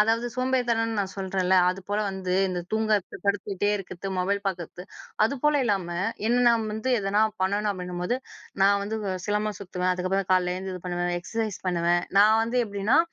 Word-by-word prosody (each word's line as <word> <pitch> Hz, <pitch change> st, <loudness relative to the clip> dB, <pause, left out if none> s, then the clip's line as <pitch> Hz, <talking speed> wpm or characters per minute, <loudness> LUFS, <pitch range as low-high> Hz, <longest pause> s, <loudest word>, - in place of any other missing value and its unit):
அதாவது 225 Hz, +3 st, +2 dB
சோம்பேறித்தனம்னு 240 Hz, -4 st, 0 dB
நான் 195 Hz, -1 st, -1 dB
சொல்றேன்ல 190 Hz, -1 st, 0 dB
அதுபோல 195 Hz, +3 st, -2 dB
வந்து 190 Hz, -1 st, -3 dB, 0.2 s
இந்த 180 Hz, -1 st, -2 dB
தூங்குறத்து, 215 Hz, -3 st, 0 dB
படுத்துகிட்டே 200 Hz, 0 st, 0 dB
இருக்கிறது, 195 Hz, -1 st, -7 dB
மொபைல் 200 Hz, +2 st, 0 dB
பார்க்குறத்து, 180 Hz, -1 st, -4 dB, 0.4 s
அது 230 Hz, -, 0 dB
போல 300 Hz, -1 st, +3 dB
இல்லாம, 195 Hz, -6 st, 0 dB, 0.4 s
என்ன 245 Hz, +2 st, +3 dB
நான் 225 Hz, -2 st, +2 dB
வந்து 220 Hz, +4 st, -2 dB
எதனா 205 Hz, +2 st, +1 dB, 0.2 s
பண்ணணும் 205 Hz, +2 st, +1 dB
அப்படின்னும்போது, 180 Hz, +3 st, -3 dB, 0.5 s
நான் 200 Hz, +1 st, +5 dB
வந்து 215 Hz, +2 st, -3 dB, 0.3 s
சிலம்பம் 210 Hz, -1 st, -1 dB
சுத்துவேன். 185 Hz, -1 st, -2 dB
அதுக்கப்புறம் 185 Hz, +1 st, -1 dB
காலையில 180 Hz, -1 st, +2 dB
எழுந்து 190 Hz, 0 st, -5 dB
இது 180 Hz, -, -9 dB
பண்ணுவேன். 175 Hz, 0 st, -1 dB
எக்ஸர்சைஸ் 220 Hz, +1 st, -3 dB
பண்ணுவேன், 175 Hz, -1 st, +2 dB, 0.2 s
நான் 215 Hz, +2 st, +6 dB
வந்து 235 Hz, +2 st, 0 dB
எப்டின்னா, 205 Hz, +5 st, +2 dB
200 Hz, 160 wpm, -26 LUFS, 185-220 Hz, 0.5 s, நான்